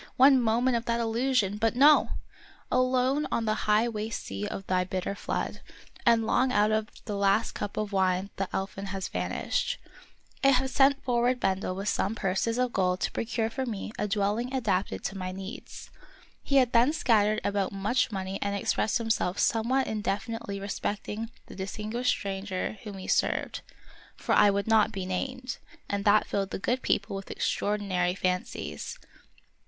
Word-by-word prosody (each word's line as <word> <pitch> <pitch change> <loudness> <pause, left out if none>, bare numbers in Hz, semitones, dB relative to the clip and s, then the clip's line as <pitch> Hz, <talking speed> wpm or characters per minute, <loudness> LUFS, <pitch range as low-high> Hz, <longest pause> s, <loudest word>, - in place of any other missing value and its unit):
one 265 0 +7
moment 240 +2 +2
of 235 0 -1
that 235 -1 0
illusion! 230 -3 +1
But 225 +2 +1
no! 290 +4 +6 0.6
alone 255 +3 +2
on 230 - 0
the 215 - +2 0.2
high 215 +3 +4
waste 220 -1 -4
sea 100 +1 -4
of 195 - -6
thy 185 -1 +1
bitter 185 +1 -3
flood 200 - -3 0.5
I 235 - +8
and 225 -1 0
long 255 +3 +2
out 210 -2 +3
of 215 0 +1 0.2
the 210 - -3
last 200 +2 +2
cup 205 -1 -5
of 215 -1 -2
wine 190 0 +1
the 195 -1 -2
elfin 195 +1 -4
has 190 -3 -4
vanished! - - -1 0.7
I - - +6
had 265 -1 +3
sent 280 +1 +4
forward 245 0 +1
Bendel 190 -2 0
with 195 +2 -4
some 200 +1 0
purses 205 +4 0
of 250 -1 0
gold 180 -1 +1
to - - 0
procure 225 -1 -2
for 260 +1 -3
me 215 -3 -4
a 210 - 0
dwelling 210 +4 0
adapted 200 -7 -1
to 195 - -3
my 185 0 -3
needs. 195 +2 -8 0.5
He 275 - -2
had 255 -3 +5
there 240 +3 +5
scattered 215 -7 +3
about 200 -1 0
much 210 +6 0
money 190 -1 -3
and 200 0 -1
expressed 215 +2 +1
himself 225 -5 0
somewhat 245 +4 +2
indefi 210 +1 -2
nitely 200 -3 -5
respecting 210 +2 -4 0.2
the - - -12
distinguished 215 +5 -3
stranger 195 +1 -2
whom 205 -3 -8
he 190 - -8
served, - - 0 0.5
for - - -1
I 205 - +6
would 200 0 0
not 220 -1 +4
be 195 -3 -4
named, 250 +7 -3 0.3
and 200 0 -2
that 210 +1 +5
filled 195 -1 -2
the - - -3
good 250 +6 -1
people 200 0 0
with 195 0 -7
extraordinary 190 -4 0
fancies. 180 -1 -3
210 Hz, 175 wpm, -28 LUFS, 195-235 Hz, 0.7 s, I